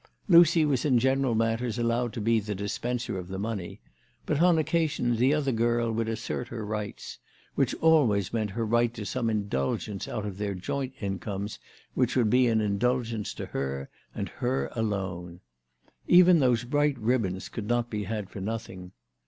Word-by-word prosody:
Lucy 170 -3 +6
was 135 -4 +1
in 135 -5 +3
general 130 0 +2
matters 115 +1 0
allowed 120 0 0
to 120 - -6
be 115 +1 +2
the 105 0 -4
dispenser 115 +2 -3
of 90 - -7
the 95 +1 -5
money; 100 -3 -4 0.5
but 150 +1 0
on 175 -1 +5
occasions 155 -7 0
the 130 +3 +4
other 150 -2 +1
girl 115 0 +1
would 115 0 -1
assert 115 +2 -3
her 115 -3 -6
rights, 105 -1 -5 0.3
which - - +1
always 125 - +3
meant 110 -2 0
her 115 +3 -2
right 120 +1 +1
to 105 - -6
some 120 +1 -1
indulgence 100 -1 -2
out 105 - -4
of 100 -2 -6
their 100 -1 -2
joint 130 +8 -3
incomes 100 +1 -4 0.3
which - - +1
would 115 -5 +3
be 125 0 +4
an 110 -2 +2
indulgence 115 +1 0
to - - -6
her 70 0 -4 0.2
and - - -3
her 130 +2 -2
alone. 95 -6 -3 0.7
Even 180 -1 +7
those 125 -4 +2
bright 145 +3 +1
ribbons 110 -5 -1
could 105 -3 -6
not 120 0 0
be 105 -2 -3
had 105 -1 -3
for 100 - -8
nothing. 95 -4 -6
115 Hz, 175 wpm, -27 LUFS, 105-125 Hz, 0.7 s, Even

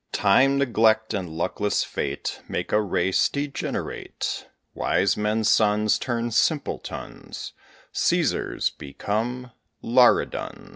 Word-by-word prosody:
Time, 135 +8 +4
neglect, 110 -4 +2
and 95 -4 -3
luckless 85 +5 -1
fate - - -4
Make - - -3
a 105 - +4
race 95 -2 +1
degenerate; 140 -1 -4 0.2
Wise - - +1
men's 105 +1 0
sons 105 0 +3
turn 120 -2 -2
simpletons; 145 +6 -2 0.4
Cæsars - - 0
become 115 - -3 0.3
Laridons. 120 +1 +2
110 Hz, 95 wpm, -24 LUFS, 105-125 Hz, 0.4 s, Time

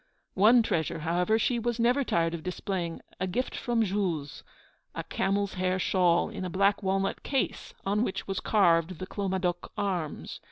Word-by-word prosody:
One 225 +5 +6
treasure, 160 -8 -1
however, 175 +6 +2
she 235 +2 +1
was 235 0 -2
never 245 +4 +3
tired 165 -8 +1
of 170 - -4
displaying, 180 -1 -3 0.2
a 185 - -1
gift 245 +8 -2
from 240 -2 +1
Jules, 180 -8 -2 0.5
a - - -3
camels' 200 +1 -1
hair 185 0 0
shawl, 180 -2 +3
in - - -5
a 185 - -3
black 200 +3 +2
walnut 195 0 0
case, 270 -2 -2
on 205 +2 +1
which 195 - -3
was 195 -1 -2
carved 170 -4 +3
the 185 - -5
Clomadoc 185 -3 -2
arms. 180 -7 -3
190 Hz, 165 wpm, -28 LUFS, 175-210 Hz, 0.5 s, One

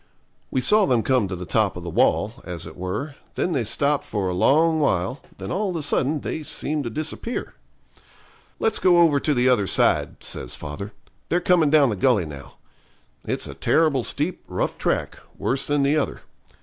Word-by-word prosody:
We 130 - 0
saw 210 +10 +4
them 120 -4 +2
come 130 -6 +2
to 95 - -4
the 90 0 -7
top 105 -1 +1
of 90 - -7
the 85 - -5
wall, 110 +7 +1
as 90 -2 -6
it 80 - -10
were, 100 - -4 0.2
then 180 - 0
they 135 -7 0
stopped 140 +6 +1
for 100 -3 -2
a - - -2
long 160 - +3
while, 125 - 0 0.2
then - - -6
all 200 +2 -1
of 180 - -4
a 160 - -2
sudden 145 0 0
they 160 - -4
seemed 150 -1 -2
to - - -2
disappear. 155 - -4 1.0
'Let's 225 - +1
go 180 -2 +4
over 165 -4 +5
to 150 +1 0
the 125 +1 +2
other 110 -6 +3
side,' - - +1
says - - -4
father; 75 +8 -7 0.4
'they're 175 +1 +1
coming 175 -4 +3
down 145 -4 +5
the - - -1
gully 100 -2 +2
now. 70 -3 -10 0.7
It's - - -2
a 70 - -6
terrible 140 - +2
steep, 155 +9 -2
rough - - -2
track, - - -1 0.2
worse 135 +1 -1
than 145 -1 +1
the 145 +3 +2
other. 150 - -2
135 Hz, 195 wpm, -23 LUFS, 100-155 Hz, 1.0 s, over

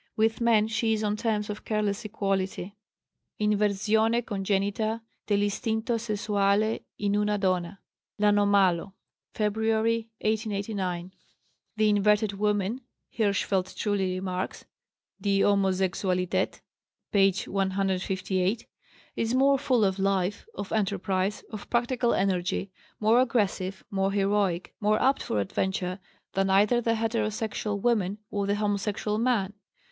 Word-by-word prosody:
With 225 +1 +1
men 225 -2 +4
she 225 0 +1
is 215 0 -1
on 210 0 +1
terms 215 -2 -1
of 210 0 -6
careless 210 0 -1
equality." 195 -2 -2 0.6
("Inversione 210 +2 +2
congenita 205 +2 -1 0.3
dell'istinto 220 +3 0
sessuale 210 -1 +1 0.2
in 205 0 0
una 210 0 +1
donna," 185 -1 -1 0.4
L'Anomalo, 200 -3 +3 0.4
February, 220 +1 +1
1889.) 200 -4 -2 0.7
"The 215 0 +4
inverted 210 0 +3
woman," 210 +3 0 0.3
Hirschfeld 200 -3 0
truly 195 -3 0
remarks 185 0 -4 0.6
(Die 195 0 +2
Homosexualität, 190 -1 +1 0.5
p. 195 -1 +5
158), 190 +1 -1 0.5
"is 230 +2 0
more 275 +1 +4
full 255 -6 +2
of 190 0 0
life, 195 - 0
of 200 - -6
enterprise, 195 -1 -1
of 215 -2 -8
practical 240 0 +1
energy, 190 0 0 0.3
more 220 +3 +4
aggressive, 200 -6 0
more 195 0 +1
heroic, 195 -3 0
more 210 0 +2
apt 270 +1 +2
for 105 - -1
adventure, 185 - -2 0.3
than 195 0 +1
either 210 +5 +4
the 230 0 +1
heterosexual 220 -2 -1
woman 205 -3 +1
or 200 -1 -1
the 200 - +2
homosexual 210 0 -1
man." 225 -5 +1
205 Hz, 110 wpm, -27 LUFS, 195-220 Hz, 0.7 s, p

